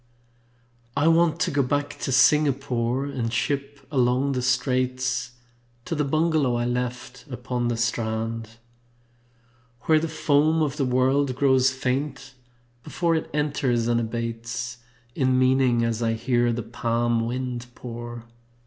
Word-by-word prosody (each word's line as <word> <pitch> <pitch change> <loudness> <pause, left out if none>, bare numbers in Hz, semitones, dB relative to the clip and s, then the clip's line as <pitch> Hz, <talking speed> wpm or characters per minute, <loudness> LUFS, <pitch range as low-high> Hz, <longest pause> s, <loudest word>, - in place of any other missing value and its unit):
I 145 +2 +3
want 165 -1 +3
to 185 - +1
go 145 -1 +2
back 145 +2 -2
to - - -2
Singapore 135 -2 +2
And 125 -5 -3
ship 140 +3 -2
along 130 0 +2
the 130 -2 -1
Straits 130 0 0 0.5
To 175 - -3
the 150 -2 0
bungalow 155 -3 +1
I 120 0 0
left 125 0 -4
upon 125 -1 -3
the 120 -1 -1
strand. 115 -1 -2 1.3
Where 155 +4 +3
the 165 - -2
foam 155 +1 +2
of 150 -1 -2
the 140 - +1
world 130 +1 +2
grows 130 -1 +4
faint 130 +2 -3 0.5
before 170 +5 -1
It 160 - -1
enters, 140 -5 0
and 120 0 +2
abates 115 +1 -4 0.3
In 130 -1 +2
meaning 130 -2 +3
as 115 0 -1
I 115 -1 +1
hear 120 +1 +1
the 120 0 -3
palm 115 0 0
wind 125 0 -4
pour. 120 -1 -7
125 Hz, 135 wpm, -24 LUFS, 120-140 Hz, 1.3 s, grows